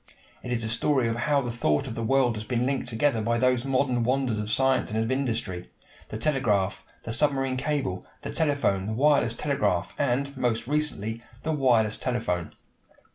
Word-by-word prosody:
It 125 - -6
is 120 -2 0
the - - -1
story 125 +2 +1
of 115 - -1
how 140 +4 +1
the 120 -2 -3
thought 75 -11 +1
of 125 - -5
the 115 - -4
world 125 0 +2
has 105 - -5
been 120 +2 -1
linked 135 -1 -1
together 120 0 +1
by 115 +2 +1
those 125 0 +2
modern 130 -2 +1
wonders 125 -2 0
of 105 0 -3
science 130 +3 +2
and 110 +1 -1
of 115 - -2
industry 115 -9 -2 0.4
the 110 - -5
telegraph, 110 -8 0 0.2
the 115 - -4
submarine 135 -2 +1
cable, 135 -9 -2 0.2
the - - -4
telephone, 140 -11 +1
the 110 - -2
wireless 135 -2 +3
telegraph, 105 -11 0
and, 140 +1 0
most 120 -3 0
recently, 120 -6 -2 0.2
the 160 - -1
wireless 120 -7 +2
telephone. 115 -9 -2
120 Hz, 185 wpm, -26 LUFS, 110-135 Hz, 0.4 s, wireless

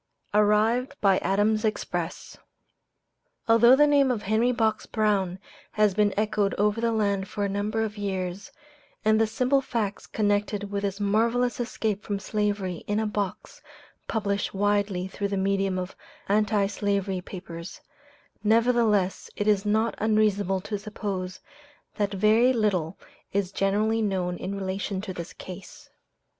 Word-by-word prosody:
ARRIVED 215 +6 +3
BY 195 -2 +4
ADAMS' 210 +2 +1
EXPRESS. 215 -1 -3 1.1
Although 235 +2 +7
the 295 +2 +6
name 285 -2 +4
of 230 -5 -1
Henry 220 +4 +2
Box 220 -3 0
Brown 200 -5 0 0.4
has 210 -2 +3
been 205 +1 +3
echoed 210 -1 +1
over 210 +2 +1
the 235 0 +2
land 200 -3 0
for 205 0 -2
a - - +1
number 205 +3 -1
of 210 -1 -5
years, 190 -1 -3 0.5
and 215 0 +4
the 225 - +3
simple 255 +5 +1
facts 215 -6 -3
connected 205 -1 -1
with 200 0 -1
his 200 0 -3
marvelous 230 +5 +1
escape 220 -4 -2
from 205 -2 -3
slavery 200 -3 -2
in 205 +1 0
a 220 - 0
box 205 -3 -4 0.5
published 200 -3 -1
widely 200 -2 +1
through 200 +1 -3
the 200 0 -2
medium 195 0 0
of 185 0 -5 0.3
anti 205 0 +2
slavery 200 -2 -1
papers, 175 -2 -8 0.6
nevertheless 220 -3 +2
it 205 - -2
is 210 -1 +2
not 220 +2 +2
unreasonable 205 -3 +2
to 205 +1 -4
suppose 195 -3 -5 0.6
that 205 -2 0
very 215 +5 +4
little 195 -7 0 0.4
is 195 -2 0
generally 210 +3 +1
known 185 -4 -1
in 195 +2 -4
relation 195 0 -3
to 195 -1 -5
this 170 -1 -7
case. 285 +11 -11
205 Hz, 145 wpm, -26 LUFS, 195-220 Hz, 1.1 s, Although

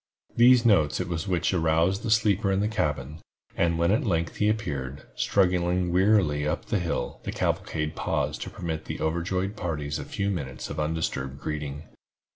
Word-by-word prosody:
These 120 0 +6
notes 85 -10 +4
it - - -2
was 85 +2 -3
which 90 -1 +1
aroused 85 +3 +2
the 115 - -3
sleeper 105 -2 +3
in 95 - +1
the 105 - +1
cabin, 75 -7 -2 0.4
and 85 -1 +1
when 85 +2 +2
at 110 - +2
length 85 -6 -1
he 105 - +2
appeared, 70 - -3
struggling 90 -2 +1
wearily 90 -7 +3
up - - -2
the - - 0
hill, - - -3
the - - -4
cavalcade 75 -1 -2
paused - - -1
to - - -4
permit 80 -2 -5
the - - -5
overjoyed 90 +5 -1
parties 75 -6 -3
a - - -4
few 100 0 -2
minutes 70 -8 -5
of 75 - -4
undisturbed 75 -3 -2
greeting. 75 -1 -4
85 Hz, 175 wpm, -26 LUFS, 75-100 Hz, 0.4 s, These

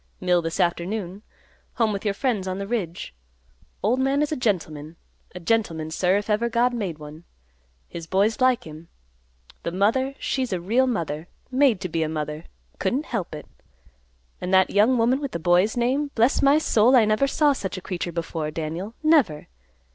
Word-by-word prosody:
Mill 180 -1 +2
this 165 0 -4
afternoon. 180 +2 -1 0.5
Home 225 -3 +1
with 200 - -4
your 205 -2 -1
friends 215 -6 -1
on 185 0 -3
the 200 - -4
ridge. 195 - -4 0.7
Old 235 +6 +2
man 270 +2 +2
is 300 - -2
a - - 0
gentleman, 160 - -2 0.4
a - - -5
gentleman, 165 -5 -1
sir, 180 +3 +2
if 205 - -3
God 210 0 +1
ever 240 +1 +1
made 190 -9 -3
one. 150 +2 -11 0.6
His 165 -1 -8
boy's 200 +7 +1
like 255 -1 +3
him. 155 +1 -11 0.7
The 170 - -3
mother, 230 +9 +1
she's 260 -3 -2
a 185 - -1
real 230 +9 +2
mother; 165 - -3 0.2
made 260 -6 +3
to 185 - -2
be 165 -1 -2
a 155 - 0
mother; 150 0 -4 0.3
couldn't 250 +11 -1
help 195 - -4
it. 150 - -9 1.0
And 180 - -3
that 190 0 +4
young 220 +6 +4
woman, 240 +3 +2
with 280 -3 -4
the - - -1
boy's 180 +7 +2
name, 265 +5 +1
bless 235 +4 +3
my 280 +1 +5
soul, 250 -4 +4
I 235 -4 +6
never 215 +6 +2
saw 290 +1 +3
such 195 -7 -5
a - - -3
creature 180 -1 -4
before, 165 -2 -3
Daniel, 165 +8 -5
never! 290 - +2
200 Hz, 185 wpm, -24 LUFS, 170-245 Hz, 1.0 s, I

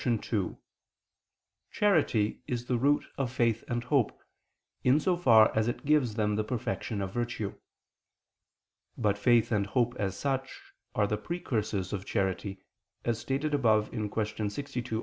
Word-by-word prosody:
2: 110 -5 -1 1.1
Charity 150 - +2
is 120 -1 -2
the 125 -1 0
root 145 +3 +3
of 130 -3 -1
faith 115 -3 +1
and 120 -1 -2
hope, 130 -3 +1 0.6
in 130 +4 +5
so 180 +3 +2
far 115 -10 +5
as 110 0 +2
it 120 - -3
gives 140 -7 +3
them 105 -2 +1
the 110 - +1
perfection 110 -2 -3
of 95 0 -5
virtue. 120 -4 -2 1.4
But 105 -3 +1
faith 120 0 +4
and 100 -3 +1
hope 120 +2 +1
as 95 -1 -1
such 135 -1 -2 0.4
are 105 - +3
the 105 +1 -1
precursors 105 - -2
of 100 -1 -3
charity, 95 -1 -1 0.5
as 115 -2 0
stated 140 +3 -2
above 110 -6 +3
(Q. 105 -1 -2
62, 120 -1 -4
A. - - -1
115 Hz, 150 wpm, -30 LUFS, 105-130 Hz, 1.4 s, in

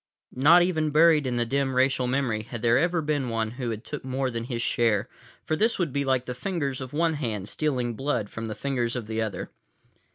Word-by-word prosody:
Not 160 +7 +6
even 160 -4 0
buried 155 -1 +5
in 125 - -1
the 120 0 +1
dim 135 +2 0
racial 130 -1 +2
memory 125 -4 0
had 115 +1 -8
there 120 +1 +4
ever 170 0 +1
been 145 -4 -1
one 110 -1 -1
who 120 -3 -3
took 135 +6 -7
more 130 0 -2
than 115 0 -4
his 120 -2 -3
share, 115 -5 +1 0.4
for 155 - -1
this 225 +7 +1
would 170 -8 -1
be 140 - 0
like 130 -2 +1
the 125 - -4
fingers 140 -1 -3
of 130 -1 -6
one 165 +2 +1
hand 110 -10 -3
stealing 125 -4 -1
blood 125 -3 -1
from 115 +2 -6
the 110 - -5
fingers 125 -4 -1
of 120 -3 -3
the 110 +1 -2
other. 110 -2 -4
130 Hz, 220 wpm, -26 LUFS, 115-150 Hz, 0.4 s, Not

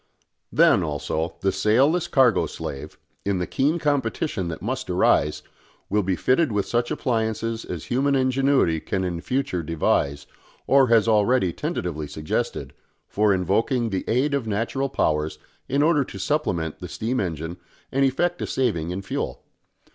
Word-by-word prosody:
Then, - - +5
also, 80 +1 -2
the 95 - +2
sailless 130 - +2
cargo 130 - +3
slave, 70 - -7 0.3
in 100 -1 0
the 90 - -1
keen 145 - +1
competition 140 - -1
that 80 - -5
must 130 +1 -4
arise, 90 -4 +2 0.5
will 105 +1 +3
be 95 -1 0
fitted 130 - +2
with 105 -2 0
such 120 0 0
appliances 115 -1 -1
as 85 -4 -5
human 140 +3 +1
ingenuity 130 - +2
can 95 +4 -2
in 85 -2 -3
future 125 -6 -1
devise, 70 -3 0 0.4
or 135 -1 +5
has 115 -1 +4
already 105 -3 +3
tentatively 75 0 -3
suggested, 75 +1 -3 0.3
for 105 0 +2
invoking 110 +6 +1
the 95 - -1
aid 130 +5 +1
of 135 -5 -1
natural 115 +6 -1
powers 75 - 0 0.3
in 140 +2 +2
order 155 -2 +3
to 100 - -9
supplement 95 - -1
the - - -6
steam 120 +4 -2
engine 80 -1 -3 0.3
and 135 +1 +2
effect 175 +7 +1
a - - -2
saving 100 -11 0
in 95 +2 -4
fuel. 95 - -4
110 Hz, 155 wpm, -24 LUFS, 90-135 Hz, 0.5 s, Then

